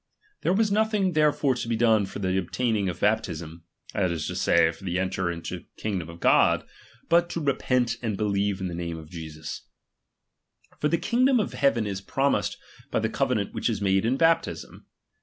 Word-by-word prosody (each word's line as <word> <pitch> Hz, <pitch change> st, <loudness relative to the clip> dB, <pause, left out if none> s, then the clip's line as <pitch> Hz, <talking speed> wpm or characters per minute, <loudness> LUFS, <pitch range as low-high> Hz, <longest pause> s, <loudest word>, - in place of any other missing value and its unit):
There -, -, +1 dB
was 210 Hz, +2 st, +2 dB
nothing 210 Hz, -2 st, +2 dB
therefore 150 Hz, -3 st, +3 dB
to 120 Hz, -, -4 dB
be 115 Hz, -, 0 dB
done 110 Hz, -3 st, +3 dB
for -, -, -8 dB
the 95 Hz, -2 st, -1 dB
obtaining 100 Hz, +2 st, 0 dB
of 90 Hz, -, -6 dB
baptism, 85 Hz, -6 st, -1 dB, 0.3 s
that 95 Hz, -3 st, +1 dB
is 80 Hz, -3 st, -3 dB
to -, -, -4 dB
say, 80 Hz, -, +3 dB
for 80 Hz, -, -15 dB
to 90 Hz, -2 st, -2 dB
en 95 Hz, 0 st, 0 dB
ter 95 Hz, -2 st, -1 dB
into 85 Hz, -1 st, -5 dB
the -, -, -22 dB
kingdom 95 Hz, -6 st, -3 dB
of 85 Hz, 0 st, -10 dB
God, -, -, +4 dB, 0.4 s
but 170 Hz, +1 st, +3 dB
to 170 Hz, -, -3 dB
repent 125 Hz, -5 st, +1 dB
and 110 Hz, -5 st, -2 dB
believe 100 Hz, -1 st, 0 dB
in 95 Hz, -, -2 dB
the 90 Hz, -, -5 dB
name 85 Hz, -1 st, -4 dB
of' 80 Hz, -1 st, -11 dB
Jesus; 80 Hz, -3 st, -7 dB, 1.1 s
for 150 Hz, -, +2 dB
the 170 Hz, -, +2 dB
kingdom 250 Hz, +6 st, +3 dB
of 210 Hz, -, -2 dB
heaven 120 Hz, -6 st, +2 dB
is 100 Hz, -2 st, -4 dB
promised 135 Hz, +7 st, 0 dB, 0.3 s
by -, -, -1 dB
the -, -, 0 dB
covenant -, -, -1 dB
which -, -, -1 dB
is -, -, -1 dB
made 95 Hz, -1 st, +2 dB
in 120 Hz, +4 st, +1 dB
baptism. 165 Hz, -, 0 dB
105 Hz, 195 wpm, -26 LUFS, 90-140 Hz, 1.1 s, God